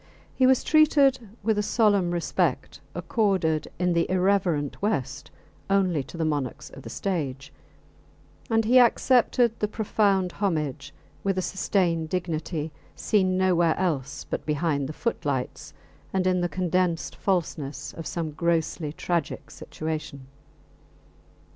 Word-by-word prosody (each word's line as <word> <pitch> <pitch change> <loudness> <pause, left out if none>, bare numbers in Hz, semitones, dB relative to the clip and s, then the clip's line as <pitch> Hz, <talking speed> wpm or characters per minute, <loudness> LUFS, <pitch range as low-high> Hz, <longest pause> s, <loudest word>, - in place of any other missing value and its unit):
He 260 - +3
was 260 -1 +4
treated 290 -4 +4 0.2
with 220 0 +1
a - - +3
solemn 205 -4 +2
respect 175 -1 -1
accorded 185 -8 0
in 180 0 +1
the 170 0 +1
irreverent 180 -6 +1
West 135 - -2 0.4
only 185 -6 +2
to 150 - -10
the 165 - 0
monarchs 145 -5 -3
of - - -11
the - - -9
stage, 145 -6 -3 1.0
and 225 -1 +2
he 250 +3 +6
accepted 245 -1 +3
the 210 - +1
profound 200 -3 +1
homage 155 -9 -2 0.3
with 195 -1 0
a 185 - 0
sustained 175 -4 0
dignity 160 -3 -3 0.2
seen 185 -4 +1
nowhere 175 -3 +3
else 145 -6 -2
but - - -3
behind 150 -2 -1
the - - -5
footlights 145 - -3 0.4
and 190 -1 0
in 185 -1 +2
the 175 - 0
condensed 180 -2 0
falseness 160 -7 -2
of 165 - -7
some 165 -3 -3
grossly 160 -1 -1
tragic 170 -2 -3
situation. 155 -4 -6
175 Hz, 130 wpm, -26 LUFS, 155-200 Hz, 1.0 s, he